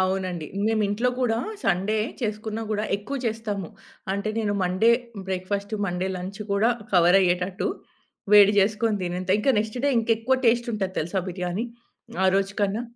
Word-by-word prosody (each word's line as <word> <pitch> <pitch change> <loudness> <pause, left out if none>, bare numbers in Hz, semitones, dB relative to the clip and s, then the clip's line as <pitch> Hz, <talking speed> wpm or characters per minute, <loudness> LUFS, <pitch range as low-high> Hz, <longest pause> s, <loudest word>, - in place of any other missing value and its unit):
అవునండి. 185 -4 -1 0.2
నేమింట్లో 220 +2 +1
కూడా 225 -2 +1 0.3
సండే 195 +4 +1 0.2
చేసుకున్న 215 0 -3
కూడా 210 0 0
ఎక్కువ 215 +8 -5
చేస్తాము. 215 -5 -3 0.4
అంటే 200 +2 -2
నేను 210 -2 0
మండే 185 +6 +3 0.4
బ్రేక్‌ఫాస్ట్ 200 +3 -2
మండే 180 +1 -2
లంచ్ 190 +3 -7
కూడా 215 +4 +3 0.2
కవర్ 175 +1 +6
అయ్యేటట్టు 180 +1 0 0.6
వేడి 205 -1 +8
జేసుకొని 210 +2 +2
తినేంత 180 +1 -3
ఇంకా 240 +6 +2
నెక్స్ట్ 215 +3 -2
డే - - +4
ఇంకెక్కువ 230 +3 +1
టేస్ట్ 240 +1 +3
ఉంటది 190 -2 -3
తెలుసా 170 +5 -2
బిర్యానీ? 180 +4 -3 0.6
ఆ - - +5
రోజు 195 0 +1
కన్నా. 205 +4 0
200 Hz, 145 wpm, -25 LUFS, 185-220 Hz, 0.6 s, వేడి